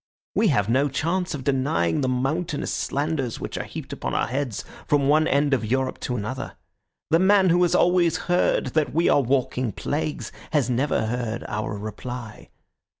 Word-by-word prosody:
We 225 - +3
have 120 - +2
no 135 +5 +2
chance 170 +5 -1
of 135 - -6
denying 130 - +1
the 130 - +1
mountainous 145 +5 -1
slanders 140 -4 -2
which - - -5
are - - -3
heaped - - -7
upon - - -3
our - - +2
heads 130 -2 -3 0.2
from 140 -2 +3
one 155 +2 +4
end 140 0 +2
of 125 -4 +1
Europe 130 +4 -1
to 125 - -3
another. 130 +5 -4 0.6
The 165 - +5
man 190 0 +5
who 175 +1 +4
has 175 -2 +3
always 175 -2 +3
heard 180 0 +1
that 155 -2 0
we 170 +1 +3
are 145 - +5
walking 130 -2 0
plagues 150 +7 -3 0.2
has 135 -5 +2
never 125 -2 +1
heard 115 0 -3
our 105 0 -3
reply. 110 +2 -7
135 Hz, 175 wpm, -24 LUFS, 125-155 Hz, 0.6 s, The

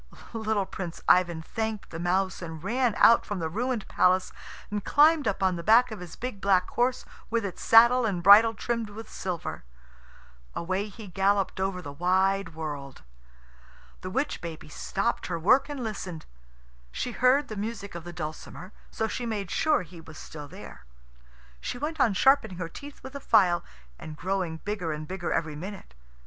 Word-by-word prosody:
Little 220 -3 0
Prince 180 -3 -6
Ivan 175 -3 +3
thanked 220 +2 -4
the 165 - -6
mouse, 185 +2 0
and 160 -2 -7
ran 240 +2 +1
out 230 - +6
from 205 - -4
the 165 -2 -2
ruined 235 +2 -2
palace, 185 +1 +2 0.4
and 205 -1 -2
climbed 300 -1 +4
up 195 -1 -1
on 185 -2 +2
the 170 - -6
back 230 +4 +5
of 215 - -6
his 180 -2 -9
big 245 -5 -6
black 185 -2 +3
horse, 245 +1 0 0.2
with 230 -2 0
its 185 - -6
saddle 235 +2 +6
and 190 -6 -1
bridle 220 +4 +8
trimmed 230 +1 -2
with 220 +2 -9
silver. 180 -4 -5 0.9
Away 185 +4 -2
he 215 +2 -11
galloped 195 +1 0
over 190 -1 -2
the 145 - -7
wide 185 +2 +1
world. 145 -4 -6 1.0
The 185 - -5
witch 270 +10 -2
baby 165 -2 -8
stopped 195 +9 -2
her 170 - -2
work 210 - +4
and 285 -4 -5
listened. 190 -7 -5 0.7
She 250 - -3
heard 255 +4 +3
the 215 - -6
music 205 -1 -5
of 170 -1 -7
the 175 - -8
dulcimer, 170 +3 -7 0.2
so 220 - -2
she 240 +2 -4
made 205 -5 -3
sure 305 -10 +2
he 170 -1 -13
was 160 -1 -13
still 150 -2 -9
there. - - -12 0.8
She - - -5
went 305 +5 -4
on 220 -6 +3
sharpening 220 -6 +3
her 170 -2 -4
teeth 285 +10 -11
with 265 - -9
a 280 - -5
file, 190 -9 +3 0.4
and 155 -1 -9
growing 185 -3 -2
bigger 200 -6 -2
and 150 0 -6
bigger 185 -1 -4
every 155 -2 -1
minute. 185 - -8
195 Hz, 180 wpm, -27 LUFS, 175-225 Hz, 1.0 s, bridle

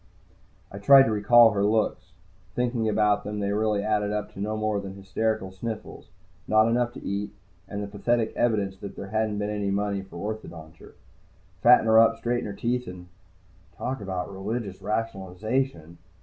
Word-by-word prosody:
I 100 - -8
tried 135 +6 +8
to 115 - 0
recall 115 +2 +6
her 100 -1 0
looks. 100 -4 0 0.4
Thinking 120 -2 0
about 105 -1 +2
them, 105 0 -4
they 100 0 -1
really 105 -1 0
added 105 -1 0
up 105 0 -3
to - - -11
no 105 +2 -2
more 110 -1 0
than 100 -1 -7
hysterical 100 +1 -2
sniffles, 110 +4 -7 0.4
not 110 +1 +4
enough 120 +1 +1
to - - -10
eat, 100 +1 -3 0.3
and 100 +1 -5
the - - -5
pathetic 110 +3 0
evidence 105 -5 0
that 100 0 -8
there 95 - -7
hadn't 110 -1 -1
been 105 0 -2
any 105 -1 -2
money 100 0 -1
for 95 - -14
orthodonture. 85 -7 -8 0.7
Fatten 125 -1 +6
her 110 0 +6
up, 115 0 +5
straighten 120 +1 -1
her 100 - -5
teeth 125 +4 -2
and 90 -1 -10 0.7
Talk 130 -2 -4
about 95 -1 -4
religious 100 0 -4
rationalization! 100 - -3
105 Hz, 170 wpm, -26 LUFS, 100-110 Hz, 0.7 s, tried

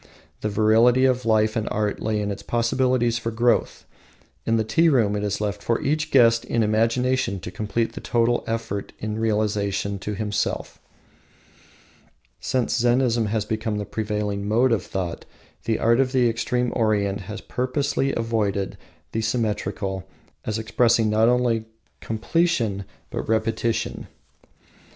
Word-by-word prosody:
The 105 - -2
virility 115 +5 +4
of 125 -2 +1
life 110 -1 +3
and 110 - -1
art 105 -1 -1
lay 110 -1 0
in 105 0 -2
its 100 - -6
possibilities 120 0 +1
for 115 - -3
growth. 120 +1 +1 0.6
In 115 - +3
the 110 - +1
tea 160 +10 +3
room 115 -8 +2
it 105 - -2
is 105 0 -1
left 105 -1 -2
for 115 - 0
each 155 +2 -1
guest 115 -3 +5
in 115 -2 0
imagination 115 0 +1
to 90 - -7
complete 115 +2 -2
the - - -7
total 120 0 +1
effect 115 -3 -3
in 110 +1 -4
relation 105 -2 0
to 105 +2 -4
himself. 105 0 -2 1.6
Since 125 -1 0
Zennism 120 -2 +2
has 105 0 -1
become 110 0 -2
the 105 - -3
prevailing 105 -2 -3
mode 120 +4 +3
of 115 -5 +2
thought, 90 -3 -4 0.4
the 110 - +1
art 115 +2 +3
of 130 0 +1
the 125 -2 +4
extreme 120 +2 -1
Orient 105 -3 +1
has 105 - -5
purposefully 135 +2 -1
avoided 105 -5 -1 0.3
the 110 - -1
symmetrical 105 -4 -2 0.4
as 110 - -1
expressing 115 0 +2
not 110 +2 +4
only 120 -2 +1 0.3
completion, 115 - 0 0.3
but - - -4
repetition. 115 +1 -1
110 Hz, 145 wpm, -23 LUFS, 105-120 Hz, 1.6 s, guest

